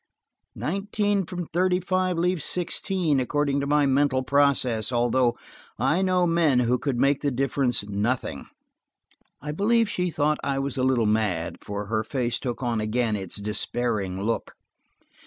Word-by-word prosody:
Nineteen 200 Hz, +1 st, -1 dB
from 180 Hz, -2 st, -5 dB
thirty 180 Hz, +1 st, +2 dB
five 185 Hz, 0 st, 0 dB
leaves 180 Hz, -1 st, 0 dB
sixteen, 180 Hz, -4 st, 0 dB
according 140 Hz, +2 st, 0 dB
to 140 Hz, -, -2 dB
my 145 Hz, 0 st, +3 dB
mental 135 Hz, -1 st, +2 dB
process, 130 Hz, -5 st, +2 dB
although 120 Hz, 0 st, +2 dB, 0.4 s
I 145 Hz, +9 st, +1 dB
know 185 Hz, -1 st, +2 dB
men 165 Hz, -7 st, +3 dB
who 125 Hz, +1 st, +1 dB
could 140 Hz, -4 st, -2 dB
make 140 Hz, +3 st, +2 dB
the 145 Hz, -, +1 dB
difference 130 Hz, -4 st, +1 dB
nothing." 105 Hz, -, -2 dB, 1.0 s
I 150 Hz, -, -3 dB
believe 225 Hz, +7 st, +2 dB
she 180 Hz, -3 st, -1 dB
thought 150 Hz, -1 st, 0 dB
I 140 Hz, -1 st, -1 dB
was 135 Hz, -1 st, -2 dB
a 130 Hz, -, -1 dB
little 130 Hz, -3 st, +2 dB
mad, 105 Hz, -6 st, 0 dB
for 100 Hz, 0 st, -5 dB
her 110 Hz, +1 st, -1 dB
face 120 Hz, 0 st, -2 dB
took 125 Hz, 0 st, -4 dB
on 115 Hz, -3 st, 0 dB
again 110 Hz, +1 st, 0 dB
its 95 Hz, -3 st, -4 dB
despairing 105 Hz, -1 st, -1 dB
look. 115 Hz, +2 st, -2 dB
135 Hz, 155 wpm, -25 LUFS, 115-170 Hz, 1.0 s, my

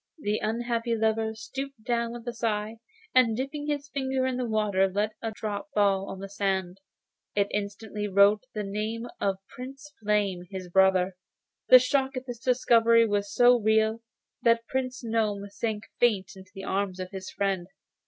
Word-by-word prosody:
The 210 Hz, -8 st, -1 dB
unhappy 235 Hz, +1 st, -1 dB
lover 220 Hz, 0 st, 0 dB
stooped 265 Hz, +2 st, -7 dB
down 235 Hz, -1 st, -1 dB
with 240 Hz, 0 st, -9 dB
a 240 Hz, -, -2 dB
sigh, 220 Hz, -1 st, -2 dB, 0.4 s
and 235 Hz, -4 st, +4 dB
dipping 290 Hz, +3 st, -4 dB
his 290 Hz, -1 st, -2 dB
finger 265 Hz, -2 st, -1 dB
in 260 Hz, -1 st, 0 dB
the 250 Hz, -1 st, -1 dB
water 205 Hz, -3 st, +2 dB
let 205 Hz, +3 st, 0 dB
fall 225 Hz, -, -3 dB
a -, -, -7 dB
drop 210 Hz, +3 st, -4 dB
on 195 Hz, -2 st, +1 dB
the 195 Hz, +1 st, -6 dB
sand. 190 Hz, -2 st, -2 dB, 0.6 s
It 200 Hz, 0 st, +2 dB
instantly 210 Hz, +1 st, -3 dB
wrote 200 Hz, +3 st, +4 dB
the 210 Hz, -, -2 dB
name 215 Hz, +3 st, -3 dB
of 195 Hz, -1 st, 0 dB
Prince 270 Hz, +4 st, -10 dB
Flame, 200 Hz, -4 st, 0 dB
his 185 Hz, -2 st, -7 dB
brother. 190 Hz, 0 st, +3 dB, 0.5 s
The 255 Hz, -, +11 dB
shock 265 Hz, +1 st, +1 dB
of 255 Hz, 0 st, -4 dB
this 245 Hz, -2 st, -6 dB
discovery 230 Hz, -2 st, +4 dB
was 205 Hz, -2 st, -1 dB
so 245 Hz, +3 st, +5 dB
real, 220 Hz, +1 st, +2 dB, 0.4 s
that 230 Hz, 0 st, +3 dB
Prince 260 Hz, 0 st, -3 dB
Gnome 215 Hz, -3 st, -1 dB
sank 210 Hz, 0 st, -3 dB, 0.2 s
fainting 195 Hz, -5 st, +1 dB
into 190 Hz, 0 st, -15 dB
the 195 Hz, -, -7 dB
arms 190 Hz, -1 st, -2 dB
of 185 Hz, 0 st, -5 dB
his 190 Hz, -1 st, -6 dB
friend. 195 Hz, -3 st, -1 dB
220 Hz, 170 wpm, -27 LUFS, 200-240 Hz, 0.6 s, The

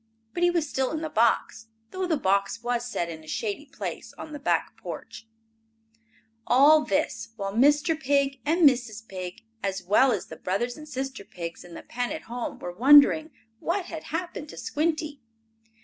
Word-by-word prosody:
But 350 Hz, -, -3 dB
he 350 Hz, -, +5 dB
was 340 Hz, -3 st, 0 dB
still 265 Hz, -2 st, 0 dB
in 315 Hz, 0 st, -3 dB
the 315 Hz, -1 st, -4 dB
box, 225 Hz, 0 st, +1 dB, 0.2 s
though 375 Hz, -1 st, -2 dB
the 325 Hz, -3 st, +1 dB
box 200 Hz, 0 st, 0 dB
was 240 Hz, 0 st, -1 dB
set 175 Hz, -7 st, -2 dB
in 160 Hz, -2 st, -8 dB
a -, -, -16 dB
shady 220 Hz, -, -3 dB
place -, -, -6 dB
on 310 Hz, -, -8 dB
the 295 Hz, -, -6 dB
back 285 Hz, -, 0 dB
porch. 225 Hz, -, -8 dB, 1.2 s
All 295 Hz, +5 st, +6 dB
this 200 Hz, +1 st, -1 dB
while 195 Hz, -2 st, -4 dB
Mr. 290 Hz, -, +4 dB
Pig 280 Hz, -3 st, +1 dB
and 325 Hz, +1 st, +5 dB
Mrs. 230 Hz, -4 st, 0 dB
Pig, 185 Hz, 0 st, -7 dB, 0.2 s
as 195 Hz, -1 st, -2 dB
well 215 Hz, +8 st, +4 dB
as 200 Hz, -6 st, -1 dB
the -, -, -10 dB
brother 200 Hz, +7 st, -1 dB
and 305 Hz, 0 st, -11 dB
sister 265 Hz, -4 st, -4 dB
pigs, 170 Hz, -3 st, -7 dB
in 175 Hz, -1 st, -12 dB
the -, -, -9 dB
pen 245 Hz, 0 st, -3 dB
at 310 Hz, -, -5 dB
home, 240 Hz, +1 st, -5 dB
were 175 Hz, -, -6 dB
wondering 290 Hz, -, +7 dB, 0.3 s
what 355 Hz, +2 st, -1 dB
had 325 Hz, -3 st, -7 dB
happened 325 Hz, -2 st, -4 dB
to -, -, -10 dB
Squinty. 310 Hz, -2 st, -2 dB
265 Hz, 180 wpm, -26 LUFS, 210-310 Hz, 1.2 s, wondering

